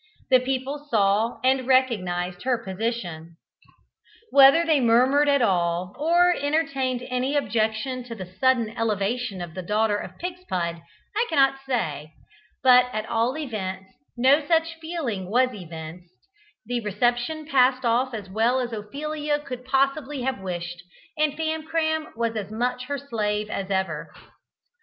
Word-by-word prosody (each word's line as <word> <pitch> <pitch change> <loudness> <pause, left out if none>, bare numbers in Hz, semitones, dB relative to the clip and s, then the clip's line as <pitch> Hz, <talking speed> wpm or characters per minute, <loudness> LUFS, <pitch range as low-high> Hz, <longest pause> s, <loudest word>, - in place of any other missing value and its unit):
The 255 - +7
people 270 +3 -3
saw 210 +1 +2
and 260 -1 +2
recognised 185 -9 +1
her 255 -1 +1
position. 190 -6 -4 0.9
Whether 280 +4 +7
they 315 -3 +3
murmured 260 +5 +4
at 280 -3 +3
all, 180 -2 0
or 345 +3 +4
entertained 275 -4 -1
any 255 +3 -1
objection 235 -1 -1
to 235 -2 -7
the 190 -4 -7
sudden 255 -4 +3
elevation 215 -1 -1
of 170 -2 -9
the 185 - -5
daughter 210 +3 +1
of - - -8
Pigspud, 185 - -4 0.3
I 455 +3 +2
cannot 270 -3 +3
say, 155 - -2 0.5
but 250 -1 +7
at 215 -2 -3
all 235 +5 0
events 190 -9 -5 0.3
no 270 +5 +4
such 330 +2 +1
feeling 265 - -4
was 250 +4 +3
evinced, 170 -2 -9 0.5
the 245 0 -1
reception 240 +9 -1
passed 260 -3 +3
off 245 +3 +2
as 205 -3 -7
well 225 +6 +1
as 240 -2 -3
Ophelia 295 +7 -3
could 260 -4 -8
possibly 275 +1 0
have 265 -2 -1
wished, 175 -2 -5 0.3
and 305 -2 +1
Famcram 315 0 -1
was 230 0 -1
as 205 -2 -4
much 250 +3 -2
her 285 +2 -3
slave 215 -6 -2
as 195 0 -3
ever. 190 -1 -2
245 Hz, 140 wpm, -24 LUFS, 205-275 Hz, 0.9 s, The